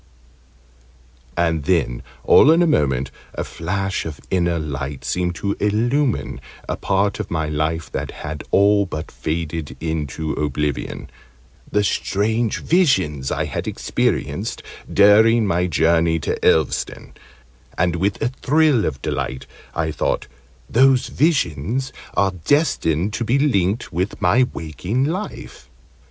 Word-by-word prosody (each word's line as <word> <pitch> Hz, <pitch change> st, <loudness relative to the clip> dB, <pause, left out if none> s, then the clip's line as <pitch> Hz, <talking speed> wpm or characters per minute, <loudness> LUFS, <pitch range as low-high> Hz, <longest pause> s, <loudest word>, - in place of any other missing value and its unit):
And 80 Hz, -3 st, +1 dB
then, 80 Hz, -9 st, +1 dB, 0.2 s
all 145 Hz, -, +6 dB
in 170 Hz, +2 st, +5 dB
a -, -, +4 dB
moment, 65 Hz, -, +1 dB, 0.2 s
a -, -, -2 dB
flash 95 Hz, +3 st, -3 dB
of 80 Hz, -2 st, -7 dB
inner 85 Hz, -2 st, +1 dB
light 70 Hz, -3 st, -5 dB
seemed 90 Hz, -1 st, -1 dB
to 100 Hz, +3 st, -2 dB
illumine 120 Hz, +6 st, 0 dB, 0.3 s
a -, -, -1 dB
part 100 Hz, +1 st, 0 dB
of -, -, -4 dB
my 80 Hz, -2 st, -1 dB
life 80 Hz, +2 st, -2 dB
that -, -, -3 dB
had 75 Hz, 0 st, -6 dB
all 100 Hz, 0 st, +4 dB
but 80 Hz, -3 st, -6 dB
faded 80 Hz, -1 st, -4 dB
into 80 Hz, -1 st, -3 dB
oblivion 75 Hz, -1 st, -2 dB, 0.6 s
the 105 Hz, -, +2 dB
strange 110 Hz, +3 st, 0 dB
visions 95 Hz, -, +2 dB
I -, -, -1 dB
had -, -, -4 dB
experienced -, -, -2 dB, 0.3 s
during 110 Hz, +3 st, +5 dB
my 90 Hz, -2 st, +1 dB
journey 80 Hz, 0 st, +2 dB
to -, -, -1 dB
Elveston: 80 Hz, -4 st, +1 dB, 0.6 s
and 85 Hz, 0 st, +1 dB
with 100 Hz, +3 st, 0 dB
a 120 Hz, -, +2 dB
thrill 145 Hz, -2 st, +2 dB
of 65 Hz, -3 st, -4 dB
delight 65 Hz, 0 st, -3 dB, 0.3 s
I 80 Hz, -1 st, 0 dB
thought 75 Hz, -, -1 dB, 0.4 s
"Those 130 Hz, +1 st, +4 dB
visions 125 Hz, -, 0 dB, 0.2 s
are 100 Hz, -1 st, +3 dB
destined 90 Hz, -, +1 dB
to 120 Hz, -, -2 dB
be 120 Hz, +4 st, +2 dB
linked 110 Hz, -, +1 dB
with 90 Hz, +5 st, -2 dB
my 125 Hz, +8 st, +3 dB
waking 90 Hz, -, -3 dB
life!" 180 Hz, +9 st, -5 dB
90 Hz, 130 wpm, -21 LUFS, 80-115 Hz, 0.6 s, all